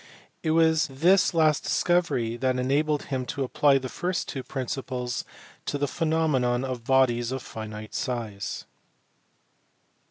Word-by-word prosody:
It 160 - -1
was 160 -1 +4
this 170 +8 +3
last 155 -3 +3
discovery 170 -10 +1
that 130 +1 0
enabled 145 +4 +1
him 130 -2 -3
to 140 - -2
apply 140 +2 +3
the 130 -1 -4
first 180 +7 -2
two 135 - -4
principles 125 -1 -4 0.4
to 145 - -1
the 145 0 0
phenomena 145 -7 +1
of 125 -3 -4
bodies 125 -2 +3
of 130 -1 -4
finite 110 -1 -8
size. 110 -6 -3
135 Hz, 130 wpm, -26 LUFS, 125-155 Hz, 0.4 s, was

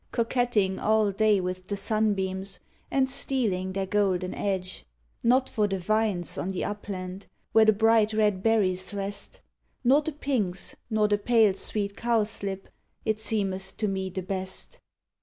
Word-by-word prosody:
Coquetting 230 -5 +1
all 215 -2 +2
(lav 210 -3 +4
with 185 0 -4
the 200 - -2
sunbeams, 195 -2 0 0.3
And 270 -1 +2
stealing 220 -9 -1
their 195 0 -1
golden 190 -2 +1
edge; 190 -2 -3 0.4
Not 255 +3 +3
for 210 -3 +1
the 195 -1 -1
vines 205 -1 0
on 185 - -2
the 190 - -2
upland. 195 -2 -5 0.2
Where 220 0 +6
the 220 - +7
bright 220 0 +4
red 210 -3 +2
berries 195 -3 +1
rest. 200 +1 -4 0.4
Nor 270 +4 +5
the 310 +1 -4
pinks, 235 -11 -1
nor 215 -2 +2
the 205 0 +1
pale 220 -2 +4
sweet 200 +1 -3
cowslip, 210 -4 -1 0.4
It 215 -1 0
seenieth 195 -4 -2
to 215 - 0
me 190 -1 -2
the 185 0 -4
best. 190 0 -5
205 Hz, 150 wpm, -27 LUFS, 190-220 Hz, 0.4 s, the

